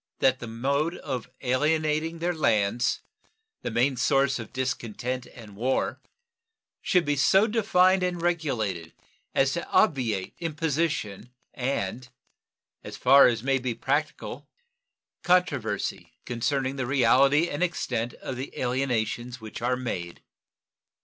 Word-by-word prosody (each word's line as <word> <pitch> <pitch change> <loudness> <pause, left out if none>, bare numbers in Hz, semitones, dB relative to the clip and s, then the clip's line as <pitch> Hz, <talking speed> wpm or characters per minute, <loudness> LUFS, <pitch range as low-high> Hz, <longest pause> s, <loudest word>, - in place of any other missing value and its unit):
That 130 -1 +3
the 120 - -7
mode 140 +9 -1
of 130 -5 -5
alienating 155 +4 +1
their 175 +2 -1
lands, 115 -5 +1 0.6
the - - -3
main 120 +4 +1
source 135 0 +2
of 115 - -8
discontent 125 -1 -3
and 110 -4 -13
war, 125 +6 -1 0.8
should 180 -2 +2
be 145 0 +1
so 190 +8 +4
defined 190 -4 +3
and 180 -1 -1
regulated 120 - -1 0.4
as 135 0 +3
to 170 - -4
obviate 120 - +1
imposition 155 - -2 0.2
and 125 -2 -3 0.7
as - - -8
far 135 +2 +7
as 120 -2 0
may 135 0 +2
be 125 -2 -3
practicable 145 +5 -2 0.7
controversy 140 - 0
concerning 130 +3 -1
the 130 -2 -2
reality 140 +4 +4
and 145 -1 -4
extent 125 -9 -1
of 130 - -6
the 130 +2 -7
alienations 125 -1 -1
which 110 0 -8
are 125 +1 +1
made. 90 -9 -5
130 Hz, 125 wpm, -26 LUFS, 120-155 Hz, 0.8 s, far